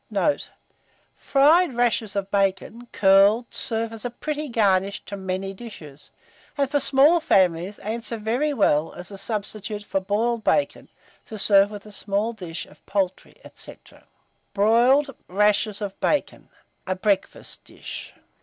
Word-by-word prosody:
Note. 220 +8 0 0.7
Fried 295 +2 +3
rashers 230 -4 0
of 200 0 -3
bacon, 200 +4 -1
curled, 200 +4 +4
serve 225 0 -1
as 225 - -7
a 245 - -2
pretty 300 +4 -5
garnish 200 -4 +1
to 200 - -6
many 190 0 -4
dishes; 155 -10 -11 0.5
and, 280 -1 0
for 290 - +2
small 280 +5 +5
families, 185 - +2
answer 225 +2 -4
very 240 +8 0
well 165 - +1
as 180 +2 -10
a 200 - -8
substitute 210 0 -4
for 195 - -1
boiled 220 +4 -1
bacon, 290 - 0 0.4
to 220 - -8
serve 200 -1 +4
with 205 -1 -9
a 210 - -12
small 205 +2 -2
dish 175 -6 -7
of 150 - -21
poultry, 190 -2 -2
&c. - - -8 0.8
BROILED 245 +7 +3
RASHERS 210 +2 +1
OF 195 -1 -6
BACON 295 - -1 0.4
(a 185 - 0
Breakfast 195 +1 -2
Dish). - - -9
210 Hz, 140 wpm, -24 LUFS, 195-240 Hz, 0.8 s, small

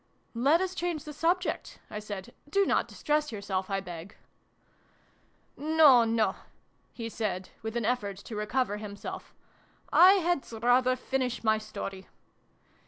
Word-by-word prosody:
" - - -40 0.2
Let 330 +4 +5
us 375 -1 -1
change 345 -4 -2
the 300 - -8
subject," 345 +5 -1
I 210 - -4
said. 205 -3 -7
" - - -24
Do 395 +5 +3
not - - +1
distress 300 -1 -1
yourself, 200 -3 -3
I 195 0 -1
beg! 175 0 -9 0.5
" - - -36
" - - -38
No, 295 -5 +6
no! 225 -1 +1 0.3
" - - -41
he 230 -2 -6
said, 200 -5 -3
with 220 +1 -4
an 235 - -1
effort 210 -5 -1
to 215 +3 -9
recover 210 +1 -1
himself. 205 -1 -8 0.3
" - - -34 0.2
I 370 +2 +9
had 350 -8 0
rather 250 +1 +4
finish 255 -1 -2
my 220 -1 +3
story 195 -3 -7
235 Hz, 165 wpm, -29 LUFS, 205-300 Hz, 0.5 s, I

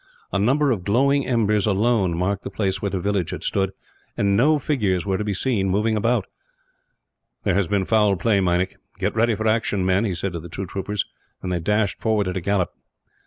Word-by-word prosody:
A 100 - 0
number 135 +7 +3
of 100 -7 -1
glowing 135 +7 +2
embers, 105 -4 +2
alone, 100 -4 +2
marked 95 +2 -1
the - - -5
place 95 -2 -2
where 100 - -1
the 95 - -2
village 100 -2 -1
had - - -5
stood; 95 -1 0 0.5
and 100 -1 +2
no 150 +8 +4
figures 105 - 0
were 95 -1 0
to - - -1
be 105 -2 -2
seen 100 -4 0
moving 105 +4 +1
about. 115 +4 +1 1.2
"There 100 - +1
has 100 -1 +1
been 100 +1 0
foul 105 -2 +3
play, 105 +2 +2
Meinik. 90 0 0 0.2
"Get 100 +3 -1
ready 115 0 +2
for 110 +2 -4
action, 110 -4 +1
men," 95 +3 +2
he 100 -5 -1
said 90 +2 -3
to 85 - -4
the 85 +2 -10
two 95 +4 -5
troopers, 100 +2 -3 0.4
and 90 - -3
they 90 - 0
dashed 105 +3 0
forward 110 -3 +1
at 90 - -3
a - - -3
gallop. 95 -1 0
100 Hz, 215 wpm, -23 LUFS, 95-110 Hz, 1.2 s, no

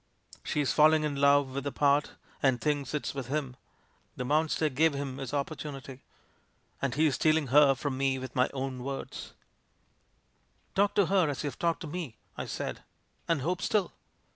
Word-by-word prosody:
She's 145 -2 0
falling 155 0 +5
in 150 -2 -1
love 140 -1 +4
with 140 0 -3
the 140 - -2
part, 145 +1 +2 0.3
and 130 -3 +3
thinks 145 0 -1
it's 150 - -2
with 135 -4 -5
him. 135 -2 -2 0.6
The 125 - -4
monster 155 +2 +2
gave 150 +2 +2
him 140 -1 -4
his 135 -3 -5
opportunity 140 -2 -5 0.4
— - - -39
and 130 -2 -1
he^s 155 -1 +3
stealing 155 -2 +2
her 140 0 +6
from 135 0 -3
me 135 -1 +1
with 130 -1 -7
my 125 - +3
own 135 -1 -4
words'/' 135 +2 -6 1.4
"Talk 200 +1 +2
to 200 - +4
her 180 -2 +3
as 140 0 -3
you've 145 -4 -4
talked 170 -1 0
to 165 - -5
me," 150 -8 -5 0.2
I - - -5
said, - - -4 0.5
"and 165 -6 +1
hope 180 +4 -1
still." 205 -4 +1
145 Hz, 175 wpm, -29 LUFS, 135-155 Hz, 1.4 s, her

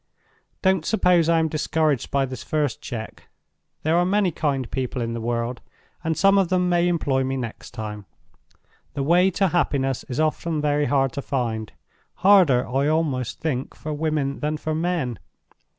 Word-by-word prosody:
"Don't 190 -3 +3
suppose 180 -4 +3
I 165 - +4
am 160 0 +2
discouraged 155 -3 0
by 140 -1 +1
this 130 -1 -7
first 150 -5 -1
check. 110 -2 -7 0.6
There 160 +2 +2
are 175 - +4
many 190 0 +2
kind 140 -4 -1
people 130 -1 -3
in 115 -1 -2
the 115 - -4
world; 120 +1 -2 0.4
and 160 -1 -1
some 195 0 +5
of 190 -3 +1
them 180 -1 +2
may 175 0 +3
employ 145 -6 +1
me 135 +1 -2
next 120 -3 -6
time. 105 -2 -7 0.9
The 140 - -1
way 175 +5 +4
to 190 +1 +1
happiness 135 -6 0
is 125 - -5
often 155 +1 0
very 145 0 +1
hard 135 -2 +2
to 140 - -3
find; 115 -6 -2 0.4
harder, 180 -10 +5
I 135 +3 0
almost 145 -6 -1
think, 135 -5 -2
for 155 - -5
women 150 -2 -1
than 150 +1 -1
for 155 +1 -3
men. 160 - -1
150 Hz, 170 wpm, -23 LUFS, 130-170 Hz, 0.9 s, some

